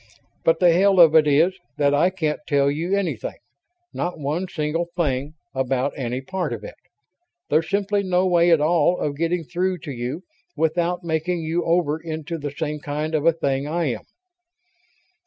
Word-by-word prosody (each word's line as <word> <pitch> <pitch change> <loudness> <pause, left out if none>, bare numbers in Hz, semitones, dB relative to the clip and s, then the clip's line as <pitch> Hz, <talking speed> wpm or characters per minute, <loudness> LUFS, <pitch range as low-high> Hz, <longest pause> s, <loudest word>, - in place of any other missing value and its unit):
But 165 0 +3
the 180 -2 +6
hell 190 +2 +4
of 165 -3 +8
it 155 -2 +5
is 155 +6 +4 0.2
that 145 -1 +3
I 155 +5 +4
can't 160 -5 -2
tell 140 -1 +3
you 170 +6 -1
anything 160 - -3 0.6
not 175 0 -3
one 155 +6 -2
single 165 +1 -2
thing 145 -2 -1 0.2
about 130 +1 0
any 125 -1 -3
part 185 +7 -3
of - - -7
it. - - -8 0.8
There's 160 0 +2
simply 200 0 +1
no 185 -1 +1
way 175 -1 +4
at 165 -3 +5
all 170 +2 +3
of 145 -1 -2
getting 165 +3 -1
through 180 +3 -1
to 145 - -5
you 125 +7 -4 0.3
without 170 +3 0
making 165 +1 -1
you 165 +2 -1
over 165 -2 +1
into 160 0 -5
the 145 0 -4
same 150 +1 -4
kind 150 0 -3
of 155 +1 +1
a - - +7
thing 140 -3 -1
I 160 -2 0
am." - - -5
160 Hz, 175 wpm, -23 LUFS, 145-175 Hz, 0.8 s, of